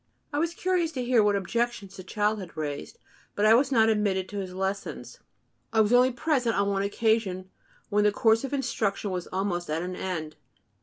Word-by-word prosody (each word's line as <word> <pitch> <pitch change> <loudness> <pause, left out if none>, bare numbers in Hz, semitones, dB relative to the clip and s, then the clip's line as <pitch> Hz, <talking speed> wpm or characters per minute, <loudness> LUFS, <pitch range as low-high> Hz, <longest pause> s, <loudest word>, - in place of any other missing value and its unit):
I 290 - 0
was 335 +2 -1
curious 355 -3 0
to 255 -3 -3
hear 245 -2 +4
what 205 -1 +3
objections 200 0 -2
the 185 - -9
child 210 +3 0
had 180 -4 -10
raised; 150 - -5 0.4
but 205 - +1
I 215 - +7
was 265 +4 +3
not 225 -4 +4
admitted 205 -4 +1
to 205 - -4
his 190 -2 -5
lessons. 190 +1 -4 0.5
I 220 - +1
was 215 +2 +2
only 250 +1 +6
present 245 -2 0
on 200 0 +1
one 195 -1 0
occasion, 200 -3 0 0.4
when 210 0 +2
the 210 - +4
course 225 +2 +3
of 270 - -4
instruction 225 -7 -1
was 180 -1 -4
almost 180 -3 -2
at 160 +2 -1
an 180 0 -4
end. 160 -5 -4
210 Hz, 200 wpm, -27 LUFS, 190-240 Hz, 0.5 s, I